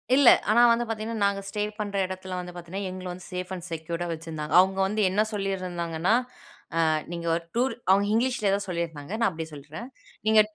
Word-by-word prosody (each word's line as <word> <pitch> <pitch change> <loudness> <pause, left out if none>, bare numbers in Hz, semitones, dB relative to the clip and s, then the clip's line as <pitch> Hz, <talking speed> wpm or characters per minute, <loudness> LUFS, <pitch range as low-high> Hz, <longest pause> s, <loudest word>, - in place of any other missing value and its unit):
இல்ல, 280 -3 +5 0.2
ஆனா 235 +3 +6
வந்து 235 +1 +2
பாத்தீங்கன்னா, 220 0 -3
நாங்க 200 0 +2
ஸ்டே 205 +1 -3 0.2
பண்ற 205 -1 -3
எடத்துல 185 0 -6
வந்து 180 0 -6
பாத்தீங்கன்னா, 185 +3 -5
எங்கள 185 0 -7
வந்து 180 0 -9
சேஃப் 180 +1 -4
அண்ட் 180 -1 -6
செக்யூர்டா 165 +2 -3
வச்சிருந்தாங்க! 160 -2 -5
அவங்க 190 +1 +4
வந்து 215 +2 -1
என்ன 205 +3 +2
சொல்லிருந்தாங்கன்னா, 180 -2 -1 0.7
"அ - - +3 0.2
நீங்க 170 0 -4
ஒரு 170 0 -2
டூர் 255 +2 +2 0.2
அவங்க 200 +1 +5
இங்கிலீஷ்ல 235 -4 +2
தான் 200 - -5
சொல்லிருந்தாங்க 170 -1 -4
நான் 230 - +3
அப்டி 160 -1 -5
சொல்றேன். 155 - -8 0.4
நீங்க 220 0 +7
185 Hz, 180 wpm, -27 LUFS, 170-210 Hz, 0.7 s, நீங்க